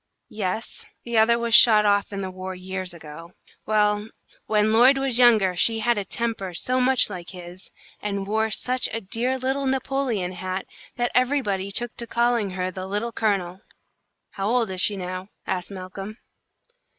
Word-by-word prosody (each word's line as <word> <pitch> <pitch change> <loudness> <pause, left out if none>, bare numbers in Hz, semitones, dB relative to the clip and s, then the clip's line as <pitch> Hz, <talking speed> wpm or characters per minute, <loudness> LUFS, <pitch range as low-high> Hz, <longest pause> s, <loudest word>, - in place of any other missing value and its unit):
"Yes, 210 +2 -4 0.2
the 235 -1 -5
other 235 +2 +4
was 235 -1 -2
shot 215 -1 +7
off 205 0 +2
in 200 -1 -4
the 190 - -4
war 185 0 -6
years 185 0 -5
ago. 165 +1 -11 0.3
Well, 210 0 +1 0.4
when 215 0 +2
Lloyd 250 +4 +6
was 270 -3 +1
younger, 215 -7 +5
she 225 +5 +2
had 235 +2 +1
a - - -2
temper 200 -4 -3
so 255 +9 0
much 260 0 +3
like 180 -4 -8
his, 180 0 -10 0.3
and 200 -1 -3
wore 220 +2 0
such 250 +3 0
a 225 - -2
dear 235 +6 0
little 265 +2 -1
Napoleon 260 -7 -1
hat, 185 +1 -4 0.3
that 240 0 -1
everybody 245 -7 +1
took 240 +4 -3
to 235 - -5
calling 235 -3 +1
her 185 0 -1
the 185 +1 -6
Little 210 +4 -2
Colonel." 195 -5 -1 0.7
"How 195 0 -3
old 235 -4 +1
is 185 -1 +2
she 205 -1 +3
now?" 185 +1 -6 0.2
asked 180 -1 -3
Malcolm. 195 +2 -8
210 Hz, 170 wpm, -24 LUFS, 185-235 Hz, 0.7 s, shot